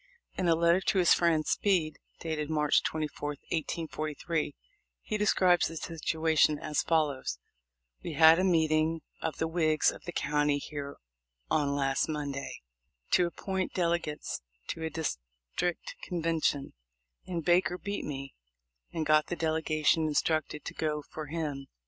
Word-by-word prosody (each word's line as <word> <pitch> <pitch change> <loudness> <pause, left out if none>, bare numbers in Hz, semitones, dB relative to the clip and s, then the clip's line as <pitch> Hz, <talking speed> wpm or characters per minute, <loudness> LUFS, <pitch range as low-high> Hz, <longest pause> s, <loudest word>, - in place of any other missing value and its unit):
In 185 - -1
a 165 - +5
letter 170 +2 +3
to 200 +1 +1
his 180 -2 +6
friend 165 -3 +2
Speed, 170 -7 +1 0.2
dated 155 -2 -3
March 150 -1 +3
24, 150 -1 -3 0.2
1843, 155 -1 -2 0.5
he 215 - -3
describes 185 -4 +3
the 165 - -7
situation 160 -2 +1
as 150 0 -1
follows: 150 - 0 0.6
"We - - -5
had 160 +1 +7
a - - +2
meeting 160 -2 +2 0.2
of 160 - -3
the 160 - 0
Whigs 160 -2 +2
of - - -12
the 175 - -4
county 145 -1 +1
here 145 -1 -6 0.5
on 140 -2 +2
last 135 0 +1
Monday, 145 -3 -4 0.5
to 175 - +4
ap 170 - -9
point 190 -1 -3
delegates 170 -4 -1 0.3
to 165 - -4
a 160 - -1
district 70 - -4
convention; 165 -5 -1 0.5
and 170 -3 -3
Baker 180 0 +3
beat 200 +2 -4
me, 135 -2 -6 0.6
and 160 -1 -2
got 155 0 +4
the 175 - -2
delegation 160 -1 +1
instructed 155 0 0
to - - -5
go 150 -1 -2
for 155 +1 -8
him. 145 -3 -4
160 Hz, 145 wpm, -30 LUFS, 150-170 Hz, 0.6 s, had